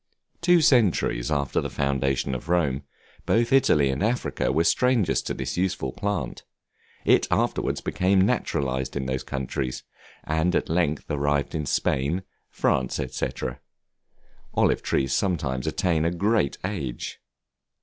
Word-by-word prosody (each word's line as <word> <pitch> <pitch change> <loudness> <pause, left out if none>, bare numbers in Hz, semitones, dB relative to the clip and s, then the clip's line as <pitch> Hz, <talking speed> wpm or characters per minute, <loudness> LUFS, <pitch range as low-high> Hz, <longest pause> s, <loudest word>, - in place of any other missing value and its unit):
Two 175 0 +5
centuries 105 - +3
after 70 -3 0
the - - -4
foundation 70 -1 0
of 65 +5 -6
Rome, 75 -6 +1 0.5
both 115 +3 +2
Italy 75 - +4
and 65 - -3
Africa 115 +4 0
were 80 - +2
strangers 125 -1 +2
to - - -4
this 65 +2 -4
useful 90 -8 -1
plant; 90 -11 -3 0.6
it - - +4
afterwards - - 0
became 95 -1 +2
naturalized 65 -7 -1
in 70 -2 -2
those 65 0 -2
countries, 65 -1 -4 0.4
and 80 +3 0
at - - 0
length 80 -3 0
arrived 70 -1 0
in 75 -3 -2
Spain, 70 +8 0 0.3
France, 65 -1 0
&c. - - -1 1.3
Olive - - +3
trees 65 -1 0
sometimes 70 -10 -1
attain 85 -4 +1
a 85 - +2
great 95 -2 +1
age. 80 -12 -4
75 Hz, 130 wpm, -25 LUFS, 65-95 Hz, 1.3 s, Two